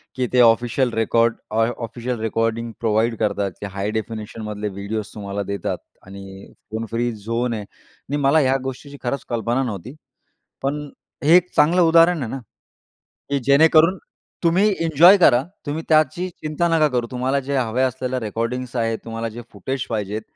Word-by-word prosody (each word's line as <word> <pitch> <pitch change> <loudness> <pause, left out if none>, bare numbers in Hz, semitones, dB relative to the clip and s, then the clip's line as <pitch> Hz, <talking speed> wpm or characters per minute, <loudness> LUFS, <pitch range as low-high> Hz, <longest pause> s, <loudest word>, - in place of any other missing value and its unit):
की 130 -1 -1
ते 125 - +4
official 120 +2 +3
record 115 +1 +2 0.2
ऑ 115 0 +4 0.2
official 120 +1 -5
recording 115 +1 -1
provide 115 +1 +1
करतात, 100 -3 0
की - - -4
हाय 100 +2 -2
डेफिनेशनमधले 110 -1 -5
व्हिडिओस 100 +2 -5
तुम्हाला 100 -1 -4
देतात 100 0 -3 0.3
आणि 95 0 -11 0.2
फोन 110 +1 -3
फ्री 120 +1 0
झोन 115 +3 -2
आहे 110 - -3
आणि 145 +7 -9
मला 145 +2 +3
ह्या 135 -1 +3
गोष्टीची 135 +2 -7
खरंच 130 +2 -2
कल्पना 120 +2 0
नव्हती. 115 - -6 0.7
पण 145 +2 -2 0.4
हे 165 +4 +7
एक 180 0 +2
चांगलं 165 +5 +4
उदाहरण 165 0 +5
आहे 115 - -4
ना, 135 - -4 0.9
की 140 - +1
जेणेकरून 160 +6 +5 0.4
तुम्ही 185 +5 +3 0.2
एन्जॉय 165 +5 +7
करा, 130 -8 +5 0.2
तुम्ही 155 +3 -3
त्याची 155 +3 +2
चिंता 165 0 -2
नका 165 -2 +3
करू. 120 -3 -1
तुम्हाला 130 +2 0
जे 140 - 0
हव्या 125 +1 +1
असलेल्या 130 0 -3
रेकॉर्डिंग्स 115 +3 -3
आहेत, 115 -1 0
तुम्हाला 115 0 -4
जे 115 +2 -8
फुटेज 130 +6 -4
पाहिजेत, 105 -1 -3
120 Hz, 160 wpm, -21 LUFS, 110-140 Hz, 0.9 s, हे